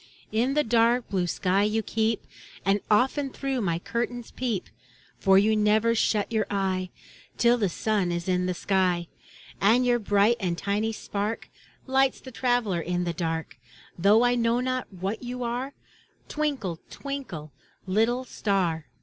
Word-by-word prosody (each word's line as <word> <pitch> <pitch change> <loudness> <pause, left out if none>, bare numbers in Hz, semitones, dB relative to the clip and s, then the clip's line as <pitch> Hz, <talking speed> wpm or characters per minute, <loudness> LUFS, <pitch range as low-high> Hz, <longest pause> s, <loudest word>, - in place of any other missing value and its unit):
In 240 +6 +1
the 300 - +3
dark 235 +1 +3
blue 185 -3 0
sky 185 +3 +1
you 215 +2 +1
keep, 220 +1 -1 0.4
And 195 +1 +2
often 265 +6 +2
through 270 -1 -2
my 170 -5 0
curtains 235 +5 -4
peep. 235 -7 -2 0.5
For 195 -1 +5
you 215 +2 +4
never 215 +2 +3
shut 215 -2 +1
your 220 -2 0
eye 190 -2 -1 0.5
Till 235 0 +5
the 200 -4 +1
sun 200 0 0
is 170 +1 -3
in 180 0 +1
the 180 - -1
sky. 180 -3 +1 0.5
And 230 +5 +4
your 240 -1 +3
bright 205 +2 +3
and 175 -4 -1
tiny 205 +4 -1
spark 210 0 -4 0.4
Lights 265 0 +2
the 260 - -11
traveler 245 -7 +1
in 180 +1 -1
the 170 -1 -2
dark; 160 -4 -3 0.4
Though 205 +6 +5
I 245 0 +4
know 235 0 +2
not 255 -1 -2
what 195 +4 -4
you 250 0 -5
are, 245 +4 -3 0.5
Twinkle, 265 - -2
twinkle, 260 - -6 0.3
little 225 +6 +1
star. 180 - -1
215 Hz, 155 wpm, -26 LUFS, 185-245 Hz, 0.5 s, For